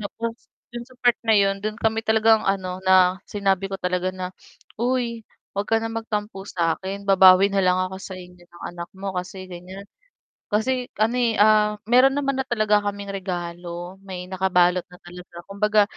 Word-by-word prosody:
Nako. 225 +3 -4 0.4
Dun 240 0 -6
sa 255 - -18
part 245 -1 +4
na 220 - +5
yun, 195 -1 +2
dun 215 0 -2
kami 220 0 0
talagang 220 0 +4
ano 185 -2 -1
na, 185 0 +5
sinabi 195 -2 0
ko - - -3
talaga 180 0 -1
na 185 0 -5 0.5
"uy 240 -2 -1 0.3
huwag 200 +1 -2
ka 225 - +4
ng 225 0 -4
magtampo 210 -3 -4
sa 165 -2 0
akin, 195 +1 -6
babawi 190 0 +7
na 200 - 0
lang 180 0 +3
ako 185 +1 -3
sa 190 - -7
inyo 180 0 -13
ng 175 0 -16
anak 170 0 -7
mo, 195 0 -4
kasi 185 +1 -5
ganyan." 180 +2 -9 0.7
Kasi 250 +4 0
ano 225 +3 +2
eh, 235 -2 +2
ah, 210 0 +4 0.2
meron 260 +2 +6
naman 275 -2 -1
na 265 - -3
talaga 215 -3 +2
kaming 200 0 -4
regalo. 175 -1 -6
May 180 -2 -7
nakabalot 180 -1 +2
na 180 -1 -15
talaga, 175 0 -13
kumbaga 210 +1 +3
195 Hz, 180 wpm, -23 LUFS, 180-220 Hz, 0.7 s, babawi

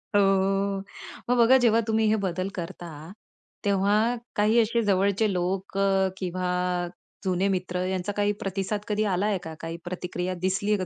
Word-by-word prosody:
हो, - - +6
हो, 195 0 +2
अ, - - -7 0.5
मग 250 - +3
बघा, 240 +3 +7
जेव्हा 230 -3 +4
तुम्ही 220 0 +2
हे 220 - +4
बदल 185 +1 -2
करता, 175 -1 -6 0.8
तेव्हा 205 +4 +2 0.2
काही 215 +3 +4
असे 230 +1 +2
जवळचे 200 +1 +2
लोक, 185 +2 -2
अ, 195 -1 +3
किंवा 180 -1 -1 0.4
जुने 185 +1 +1
मित्र 180 0 -2
यांचा 185 +1 -2
काही 205 0 +2
प्रतिसाद 195 +2 -2
कधी 210 0 0
आलाय 200 +2 +1
का, 160 - -6
काही 165 +1 -5
प्रतिक्रिया 180 0 -3
दिसली 195 +3 0
आहे 210 - +4
का 185 - -3
195 Hz, 165 wpm, -26 LUFS, 185-210 Hz, 0.8 s, बघा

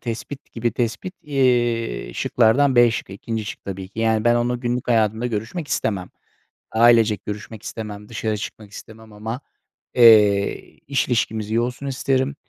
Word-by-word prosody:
Tespit 130 +4 -7
gibi 115 0 -1
tespit. 120 - -3
Eee, 120 - 0
şıklardan 125 +4 +3
B 120 -1 +7
şıkkı, 105 -4 -5
2'nci 110 +2 -4
şık 105 - -8
tabii 95 -1 -6
ki. 105 - -14
Yani 110 -1 +1
ben, 120 0 +4
onunla 120 +1 0
günlük 120 0 -3
hayatımda 110 0 +2
görüşmek 120 +8 -4
istemem. 95 -9 -2 0.6
Ailecek 115 -3 +4
görüşmek 105 +1 -7
istemem, 105 -3 -7
dışarı 110 -2 -2
çıkmak 105 0 -8
istemem 110 +1 -12
ama, 110 +4 -5 0.6
eee, 105 -4 +5
iş 135 -1 0
ilişkimiz 110 -3 -1
iyi 115 - +2
olsun 125 +3 -4
isterim. 135 +1 0
115 Hz, 150 wpm, -22 LUFS, 110-125 Hz, 0.6 s, B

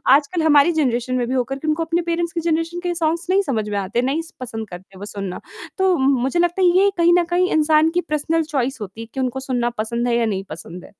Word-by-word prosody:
आजकल 300 +4 0
हमारी 300 +1 +5
जनरेशन 255 -5 0
में 245 -1 0
भी 255 - -2
होकर 265 +2 -1
तुमको 310 +1 0
अपने 330 +1 0
पेरेंट्स 340 0 -2
की 335 - -2
जनरेशन 330 +1 -1
के 355 -1 -1
सॉन्ग्स 330 0 -1
नहीं 385 +2 +4
समझ 225 - -2
में 205 - -2
आते, 200 +5 -1
नहीं 275 +6 0
स 330 - -14
पसंद 225 -3 -6
करते 185 +2 -11
वो 205 - -6
सुनना, 195 -3 -5 0.4
तो 380 -1 +3
म 265 +1 +3
मुझे 270 +7 0
लगता 350 +2 +1
है 365 - +5
ये 395 +1 +5
कहीं 340 0 +5
न - - +2
कहीं 360 +1 +2
इंसान 310 0 +4
की 355 - +3
पर्सनल 320 +2 0
चॉइस 275 -4 -2
होती 210 +3 -7
है 230 - -8
कि - - -5
उनको 260 0 -1
सुनना 250 -3 -1
पसंद 235 +3 -1
है 240 - +1
या 235 - +2
नहीं 195 -3 -2
पसंद 165 +3 -9
है। - - -16
285 Hz, 255 wpm, -21 LUFS, 235-335 Hz, 0.4 s, हमारी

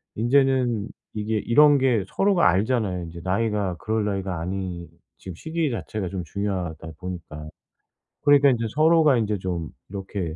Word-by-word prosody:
인제는 125 -2 +2 0.2
이게 110 +1 -2
이런 145 +6 +5
게 125 -7 +2
서로가 195 - +3
알잖아요. 95 -3 0
이제 85 +1 -9
나이가 100 -1 0
그럴 110 0 -1
나이가 95 -4 -2
아니 90 -1 -4 0.3
지금 95 -3 -9
시기 160 - -2
자체가 105 -5 -4
좀 95 -3 -4
중요하다 90 -4 -4
보니까. 80 -4 -7 0.7
그러니까 145 -1 +6
인제 115 -2 -1
서로가 155 -3 +4
인제 105 -3 -1
좀 85 -4 -3 0.2
이렇게 95 -4 -5
105 Hz, 330 characters per minute, -24 LUFS, 90-125 Hz, 0.7 s, 그러니까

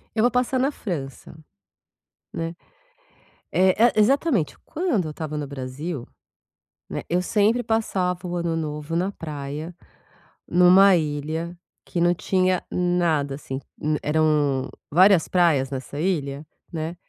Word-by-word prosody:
Eu 220 - +2
vou 245 - +4
passar 250 +1 +1
na 265 +2 +2
França, 155 - -6 1.0
né. 165 +1 -4 1.0
É 190 +4 +4
é - - +2
exatamente, 230 - +2
quando 305 - -1
eu - - -4
estava 155 0 -5
no 150 -1 -3
Brasil, 135 +1 -5 0.8
né. - - -4
Eu 175 +1 +1
sempre 215 +6 +2
passava 185 -6 -1
o 175 0 -3
Ano 170 -1 -1
Novo 150 0 -3
na 185 +4 0
praia, 150 0 -6 0.7
numa 185 +2 +6
ilha 160 +2 -3 0.3
que 175 - -3
não 175 +1 +4
tinha 185 0 +1
nada 170 -6 +1
assim, 135 -2 -6 0.4
eram 150 -3 +1 0.2
várias 185 +1 +5
praias 160 -7 +3
nessa 135 +2 -5
ilha, 150 -5 -1 0.3
né. 160 +1 -4
170 Hz, 125 wpm, -24 LUFS, 150-185 Hz, 1.0 s, numa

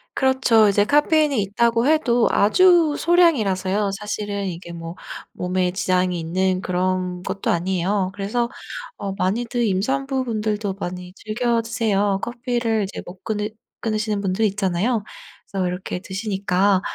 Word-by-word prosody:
그렇죠. 260 -5 +4
이제 205 0 +3
카페인이 295 0 +3
있다고 230 +5 +1
해도 245 -7 +3
아주 335 - +5
소량이라서요. 210 - +2
사실은 205 -1 -3
이게 170 -1 -7
뭐 165 +1 -7 0.4
몸에 180 0 -1
지장이 180 -1 0
있는 185 +3 0
그런 185 0 -1
것도 190 +1 -3
아니에요. 185 +2 0
그래서 220 +5 -1 0.5
어 200 -1 -4
많이들 230 +5 -1
임산부 265 +7 0
분들도 215 -3 -1
많이 180 0 -6
즐겨 230 +3 -1
드세요. 205 -4 0
커피를 240 -3 -1
이제 195 - -5
못 180 +1 -12
끊으 210 -1 -2 0.3
끊으시는 215 -2 -1
분들 195 +3 0
있잖아요. 200 +3 0 0.5
그래서 190 -2 0
이렇게 180 0 -4
드시니까 190 -1 0
205 Hz, 320 characters per minute, -22 LUFS, 185-235 Hz, 0.5 s, 아주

